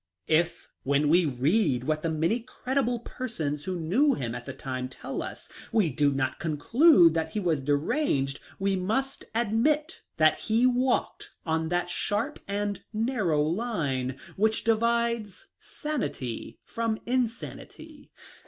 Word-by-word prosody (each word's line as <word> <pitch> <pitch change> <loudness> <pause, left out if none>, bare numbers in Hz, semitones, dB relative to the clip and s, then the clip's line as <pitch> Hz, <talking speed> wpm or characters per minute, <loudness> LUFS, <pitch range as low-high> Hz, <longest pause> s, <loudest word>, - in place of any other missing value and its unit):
If, 170 +2 +1
when 140 +2 +2
we 175 +2 +5
read 140 - +1
what 155 +2 0
the 165 - -1
many 165 +9 +1
credible 245 0 -2
persons 160 - -4
who 185 -2 -2
knew 245 - +3
him 120 -3 -3
at - - -7
the - - -3
time 130 -1 -4
tell - - -5
us, - - -7 0.2
we 200 -9 +2
do 145 +2 +2
not 135 +1 -1
con 160 -5 -2
clude 230 - +6
that 160 -1 -2
he 215 - 0
was 165 -7 0
deranged, 145 - 0 0.2
we 195 0 +1
must 225 +9 -2
admit 240 +8 +1 0.2
that 155 -1 +4
he 225 +2 +2
walked 255 0 0
on 160 -1 0
that 175 0 -1
sharp 220 +12 -2
and 205 0 -2
narrow 215 - +1
line 150 - -1 0.2
which 220 +2 +2
di 225 - +4
vides 235 -2 -1
sanity 245 - -4
from 230 -1 -2
insanity. 245 -1 -4
185 Hz, 145 wpm, -27 LUFS, 150-235 Hz, 0.2 s, clude